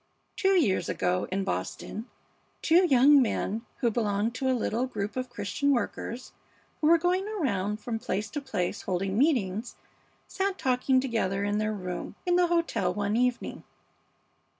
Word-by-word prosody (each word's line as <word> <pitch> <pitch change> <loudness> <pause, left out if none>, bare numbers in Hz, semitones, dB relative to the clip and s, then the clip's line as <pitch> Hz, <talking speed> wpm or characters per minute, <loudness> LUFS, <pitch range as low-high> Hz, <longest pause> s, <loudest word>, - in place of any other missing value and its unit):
"Two 385 0 +2
years 210 - +1
ago 180 0 0
in 195 +1 0
Boston 190 - -4 0.6
two 355 +3 +5
young 275 +1 +6
men, 225 -2 -1 0.2
who 235 -3 +2
belonged 215 0 0
to 265 +1 -1
a 255 - +2
little 235 +2 -1
group 205 -4 -4
of 255 0 -3
Christian 205 +8 -1
workers 245 -1 -2 0.5
who 305 - +2
were 335 +1 +7
going 360 +4 0
around 210 - -1
from 225 +1 -4
place 210 0 -2
to 290 - -3
place 180 -10 -2
holding 190 +1 -2
meetings, 235 - +1 0.5
sat 390 0 -1
talking 255 0 +2
together 220 -7 -1
in 205 +1 0
their 215 0 0
room 180 -2 -5
in 355 -1 +2
the 355 0 +4
hotel 340 -1 +1
one 205 0 -1
evening." 250 0 -1
235 Hz, 155 wpm, -28 LUFS, 205-285 Hz, 0.6 s, were